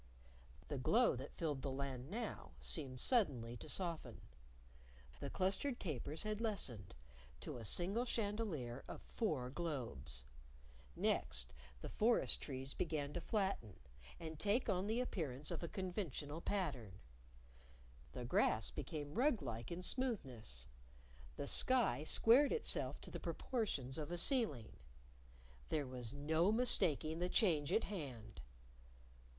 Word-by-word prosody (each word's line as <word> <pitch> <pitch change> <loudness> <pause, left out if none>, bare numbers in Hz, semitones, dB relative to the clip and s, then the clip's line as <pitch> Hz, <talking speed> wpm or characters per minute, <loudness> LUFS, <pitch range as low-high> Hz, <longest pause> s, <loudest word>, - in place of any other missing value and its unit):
The 145 - -3
glow 230 - +4
that 135 +3 -7
filled 150 -5 -1
the 140 - -2
Land 135 -1 -3
now 220 - -4
seemed 130 - -1
suddenly 130 - +2
to - - -9
soften. 165 - 0 1.0
The 140 - -4
clustered 200 - 0
tapers 155 - -3
had 215 0 -2
lessened 130 - -2 0.5
to 150 - -5
a 115 - -7
single 195 - +3
chandelier 200 - -1
of - - -7
four 145 - -1
globes. 125 - -4 0.7
Next, - - 0 0.3
the - - -4
forest 230 +2 +3
trees 135 -1 -4
began 150 -3 -1
to 175 - -2
flatten, 190 - -1 0.4
and 160 -2 -6
take 210 +5 +2
on 190 -1 +1
the 225 +3 +1
appearance 150 - -2
of 170 - -2
a 170 - -2
conventional 175 - -3
pattern. 140 - -1 1.2
The - - -4
grass - - +2
became 145 - -4
rug 245 - +3
like 115 0 -4
in 175 +2 -4
smoothness. 130 - -1 0.7
The 145 - -3
sky 245 - +3
squared 240 - +6
itself 465 - +1
to - - -8
the - - -4
proportions 160 - -2
of 155 +2 -4
a 175 - -1
ceiling. 175 - +2 0.9
There 150 -2 +1
was 125 -3 -5
no 160 +6 +2
mistaking 165 - +3
the 180 +1 0
change 165 - +3
at 220 - +3
hand! 140 - -6
155 Hz, 130 wpm, -40 LUFS, 130-205 Hz, 1.2 s, squared